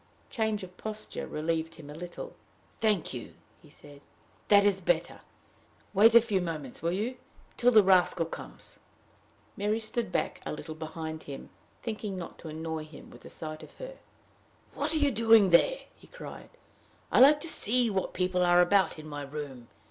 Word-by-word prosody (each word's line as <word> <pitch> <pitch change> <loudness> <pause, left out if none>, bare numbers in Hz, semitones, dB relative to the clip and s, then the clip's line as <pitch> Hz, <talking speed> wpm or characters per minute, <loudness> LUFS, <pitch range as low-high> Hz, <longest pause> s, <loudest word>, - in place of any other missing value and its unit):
Change 220 -4 -1
of 180 -1 -10
posture 215 0 -5
relieved 160 +1 -2
him 150 - -12
a 145 - -9
little. 175 - -8 0.4
"Thank 210 -10 +1
you," 120 -3 -8 0.3
he - - -18
said. 145 -1 -14 0.5
"That 200 -1 +6
is 195 -2 +3
better. 170 -1 0 0.7
Wait 220 +4 +6
a 235 - +10
few 210 -5 0
moments, 155 -7 -5
will 165 +2 0
you 225 +7 -2 0.4
till 245 - +4
the 215 -3 +7
rascal 185 -3 +4
comes?" 165 - -10 0.8
Mary 210 +2 0
stood 225 -2 -2
back, - - -2
a - - -4
little 155 +1 -7
behind 160 0 -6
him, 140 -1 -9 0.3
thinking 215 -4 -4
not 175 - -8
to - - -10
annoy 160 0 -4
him 155 -2 -13
with - - -14
the - - -12
sight 155 -1 -7
of - - -14
her. - - -9 0.7
"What 290 +2 -2
are - - +3
you 290 -2 +3
doing 225 -4 +5
there?" - - +4
he - - -19
cried. - - -10 0.6
"I - - +4
like 290 +3 +8
to 335 - -3
see 245 -5 +2
what 190 -1 -2
people 180 0 0
are 175 0 +5
about 190 +1 +3
in 155 - -10
my 145 -1 -6
room. 140 -4 -7
180 Hz, 180 wpm, -29 LUFS, 160-220 Hz, 0.8 s, a